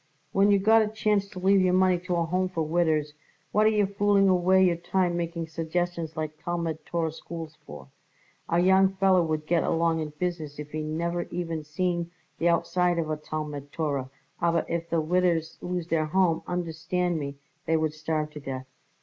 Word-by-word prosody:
"When 195 +1 +4
you 200 - +5
got 220 +3 +5
a 215 - +1
chance 210 -2 0
to 200 -2 -13
leave 190 +1 +4
your 185 0 +3
money 185 -1 +4
to 180 0 -2
a 170 -1 +1
Home 185 +2 0
for 165 -3 -2
widders, 155 -2 +1 0.4
what 215 +1 +4
are - - +6
you 210 -2 +2
fooling 200 0 +3
away 185 +1 +4
your 175 -2 +3
time 175 0 0
making 170 -1 -3
suggestions 165 0 -3
like 155 0 -5
Talmud 170 -2 -2
Torah 165 -2 -1
schools 160 0 -8
for? 75 -3 -10 0.6
A 170 - +2
young 190 +2 +4
feller 190 -1 +4
would 155 -2 -1
get 170 +1 +2
along 165 0 +1
in 155 -1 -3
business 160 -4 -3
if 150 0 -7
he 155 - -3
never 170 +3 -2
even 165 -3 -3
seen 170 +2 -1 0.3
the 170 - +3
outside 175 +1 +2
of 160 -2 -1
a - - +1
Talmud 150 -2 -6
Torah, 140 -5 -2 0.3
aber 170 -1 +2
if 170 0 -3
the 165 - +1
widders 170 -1 +1
lose 180 -1 -3
their 155 -1 +1
Home, 175 0 +2
understand 175 0 -1
me, 140 -1 -5 0.3
they 165 - +3
would 155 -1 0
starve 155 0 -2
to 150 - -8
death." 130 -2 -6
170 Hz, 190 wpm, -27 LUFS, 155-180 Hz, 0.6 s, are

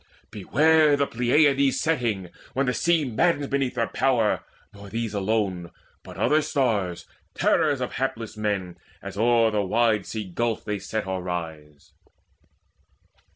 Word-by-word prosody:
Beware 150 - +3
the 140 - +2
Pleiads' 135 +3 +2
setting, 115 - -1 0.2
when 135 +1 0
the 125 - 0
sea 170 0 +2
Maddens 145 +5 +1
beneath 135 -2 -1
their 115 -1 +1
power 120 -5 +1 0.3
nor 100 -1 -12
these 115 0 -3
alone, 100 -4 -1 0.3
But - - -12
other 155 +1 +3
stars, 110 - -1 0.3
terrors - - +2
of - - -2
hapless 115 -5 -3
men, 100 -5 -3 0.2
As - - -7
o'er 115 +1 +3
the 105 -1 +1
wide 110 0 +1
sea 110 -1 -4
gulf 110 +5 -2
they 105 -1 -2
set 110 +1 -4
or 95 -1 -3
rise." 80 -5 -7
115 Hz, 140 wpm, -25 LUFS, 100-135 Hz, 0.3 s, Beware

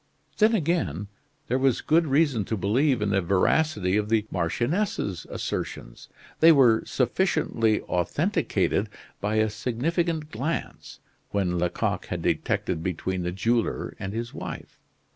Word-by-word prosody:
Then, 220 +1 +5
again, 110 - -1 0.4
there 130 - 0
was 130 -3 +2
good 160 +1 +3
reason 140 -5 +2
to 110 - -2
believe 120 +5 +2
in 105 - 0
the 100 -1 +2
veracity 100 - +2
of 105 0 -1
the 110 -1 +2
marchioness's 100 - -1
assertions. - - -5 0.3
They 165 +1 +8
were 125 -7 +5
sufficiently 120 - +1
authenticated 90 -2 0 0.3
by 105 +2 -1
a 110 0 +3
significant 150 - -2
glance 140 +9 -4 0.3
which 100 -1 0
Lecoq 90 0 -1
had - - -4
detected 85 -3 0
between 90 +1 -2
the 90 0 -2
jeweler 115 +5 -1
and 95 - -4
his 115 +2 -4
wife. - - -8
110 Hz, 130 wpm, -26 LUFS, 95-150 Hz, 0.4 s, They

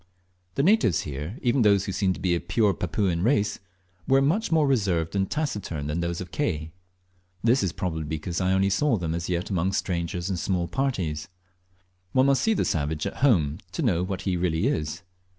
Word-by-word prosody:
The 140 - +1
natives 160 - +4
here, 75 - -5
even 125 +1 +2
those 100 -3 +4
who - - -3
seem 95 0 +1
to 85 - -9
be 90 -1 +1
of 85 0 -2
pare 100 +1 +3
Papuan 90 0 -1
race, 105 -2 +1 0.5
were 135 0 +5
much 165 +10 +1
more 160 -2 +4
reserved 95 - +1
and 95 -1 0
taciturn 105 - -3
than 75 +3 -2
those 85 0 -2
of 90 - -7
Ke. 80 - -2 0.7
This 120 +4 +4
is 95 -4 0
probably 80 -3 -3
because 80 +4 -3
I 90 0 +2
only 95 +1 +2
saw 125 +4 +2
them 80 -3 -2
as 85 +1 -3
yet 90 +3 -2
among 95 +1 0
strangers 85 -1 -2
and 95 -2 -1
in - - -3
small 90 -3 0
parties, 90 - -2 0.9
One 130 0 +4
must 140 -1 +3
see 220 0 +2
the - - +1
savage 75 0 -1
at - - -4
home 85 - +3
to 165 - -2
know 90 -9 +2
what 95 0 -3
he 95 -2 0
really 85 +1 0
is. 80 - -1
95 Hz, 205 wpm, -26 LUFS, 85-120 Hz, 0.9 s, were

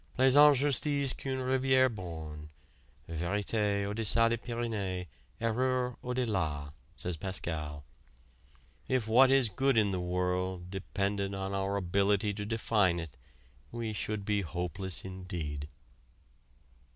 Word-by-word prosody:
"Plaisante 140 +2 +7
justice 140 0 +2
qu'une 135 -1 -4
rivière 130 0 +3
borne. 80 -6 -7 0.6
Vérité, 100 +4 -1
au 100 - -3
deçà 115 +1 +3
des 115 - +1
Pyrénées, 110 -6 -3 0.3
erreur 125 +2 0
au 125 0 -3
de 130 0 +1
là," 75 -9 -2 0.2
says 90 -2 -2
Pascal. 75 -5 -4 1.0
If 130 -4 0
what 130 +4 +6
is 135 -2 +5
good 130 +4 +1
in 105 -2 +4
the 95 - -1
world 90 0 -2
depended 100 0 -2
on 95 0 -3
our 100 0 -1
ability 100 +2 +1
to 105 0 -5
define 105 -5 +2
it 80 -3 -6 0.6
we 115 -2 -3
should 105 -1 -3
be 105 -1 +1
hopeless 90 +2 -3
indeed. 90 -6 -5
100 Hz, 125 wpm, -31 LUFS, 90-120 Hz, 1.0 s, Plaisante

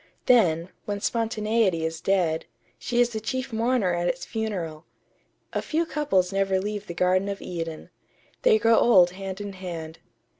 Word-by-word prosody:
Then, 180 -9 +4 0.2
when 205 -1 -3
spontaneity 215 -5 0
is 160 0 -4
dead, 175 -5 +1 0.3
she 240 -1 -1
is 240 0 +4
the 220 - -3
chief 255 +3 -4
mourner 225 -4 +1
at 175 0 0
its 175 0 -2
funeral.... 180 -8 -4 0.7
A - - 0
few 330 +2 0
couples 200 - 0
never 195 -1 +1
leave 205 +1 -4
the 170 - -6
Garden 185 +3 +2
of 200 - -4
Eden. 165 -3 -6 0.5
They 470 -3 +5
grow 230 - +4
old 180 -7 +6
hand 190 +1 -6
in 205 -1 -6
hand. 165 -4 -7
195 Hz, 160 wpm, -25 LUFS, 175-225 Hz, 0.7 s, old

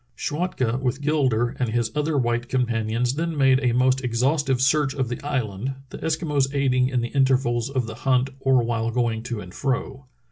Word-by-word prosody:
Schwatka 130 - -1
with 130 +1 -1
Gilder 130 -6 +1
and 125 -3 0
his 115 0 0
other 150 0 0
white 120 -1 0
companions 120 -1 0
then 165 +2 -2
made 135 -2 +4
a 125 - +3
most 130 +2 +2
exhaustive 130 +3 +1
search 140 +1 +2
of 130 -4 -1
the 120 - -5
island, 130 -3 -2 0.2
the - - -8
Eskimos 150 -4 0
aiding 130 -2 +2
in 125 -2 0
the 120 - -3
intervals 130 -3 +1
of 130 -3 -1
the 110 - -6
hunt 130 0 +2
or 135 -2 +3
while 115 -1 -1
going 115 -2 0
to 120 -2 -5
and 90 -1 -11
fro. 135 0 -3
130 Hz, 185 wpm, -24 LUFS, 120-135 Hz, 0.2 s, made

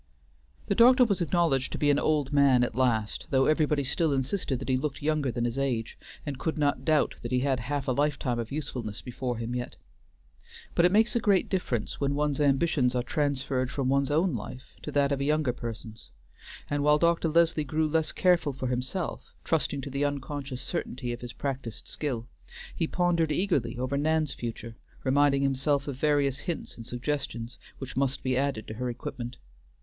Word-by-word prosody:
The - - +1
doctor 250 +2 +7
was 200 -5 0
acknowledged 165 -6 +1
to - - -2
be 145 -1 +3
an 145 - +3
old 150 -3 +1
man 140 -3 +5
at 120 - -1
last, 115 -4 0
though 135 -1 +3
everybody 150 -1 +2
still 145 +3 +1
insisted 135 +1 -1
that 130 - -7
he 130 - +3
looked 140 +2 -3
younger 150 -3 +1
than 120 0 -1
his 120 +3 -2
age, 120 -5 -1 0.3
and 140 -3 -4
could 160 - -2
not 145 -3 +1
doubt 155 +1 +2
that - - -5
he 125 0 +2
had 135 -1 +1
half 140 +3 -3
a - - +2
lifetime 135 -3 0
of 115 -1 -4
usefulness 125 -7 -4
before 125 -1 -3
him 115 +1 -4
yet. 125 0 -4 1.0
But 170 - +4
it 180 - +5
makes 220 +4 +3
a - - +4
great 200 -4 +2
difference 130 - -2
when 140 0 +1
one's 145 -1 0
ambitions 135 -3 +2
are 125 - +1
transferred 135 -2 -1
from 130 -1 -1
one's 140 +1 +2
own 160 +3 +2
life 125 +3 -7
to - - -6
that 140 0 +2
of 140 -1 0
a - - +1
younger 150 -3 +1
person's; 115 -2 -7 0.6
and 145 0 -1
while 150 0 +5
Dr. 170 +1 +2
Leslie 165 -1 +3
grew 155 +2 0
less 160 0 +1
careful 175 -6 +2
for 130 -1 -3
himself, 130 +8 -3
trusting 150 -3 0
to 140 - -7
the 140 +2 -1
unconscious 140 -2 -3
certainty 125 -1 -3
of 120 - -8
his 120 -1 -7
practiced 130 -6 -5
skill, 125 -6 -3 0.5
he 165 - 0
pondered 170 -3 +1
eagerly 160 - 0
over 130 +2 -1
Nan's 155 0 +1
future, 115 -1 -6 0.3
reminding 140 +1 +3
himself 135 +1 +1
of 140 -3 -4
various 140 -2 +2
hints 170 -4 -4
and 115 -1 -10
suggestions, 120 -2 -3 0.2
which 135 -1 -7
must 135 0 0
be 130 -1 +1
added 135 -5 0
to - - -5
her 125 +3 -3
equipment. 120 0 -6
140 Hz, 195 wpm, -28 LUFS, 125-150 Hz, 1.0 s, doctor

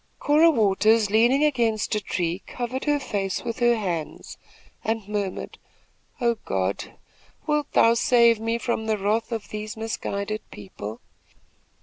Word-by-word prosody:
Cora 305 +3 +5
Waters, 215 -3 +3
leaning 240 +6 +4
against 235 -8 +1
a 210 - 0
tree, 180 -1 -2
covered 250 +1 -4
her 295 -1 +2
face 200 -7 -3
with 230 +1 -4
her 240 -1 +4
hands 175 -8 -4 0.5
and 220 -2 -2
murmured: 205 -3 -4 0.6
"Oh, 235 -2 +1
God! 95 0 -2 0.5
wilt 300 -1 0
thou 230 - +5
save 235 -1 +4
me 225 +1 -1
from 235 -2 -2
the 215 -1 +1
wrath 215 +4 0
of 225 -3 -4
these 215 +2 -6
misguided 215 -1 -3
people?" 105 +2 -8
220 Hz, 135 wpm, -24 LUFS, 200-235 Hz, 0.6 s, Cora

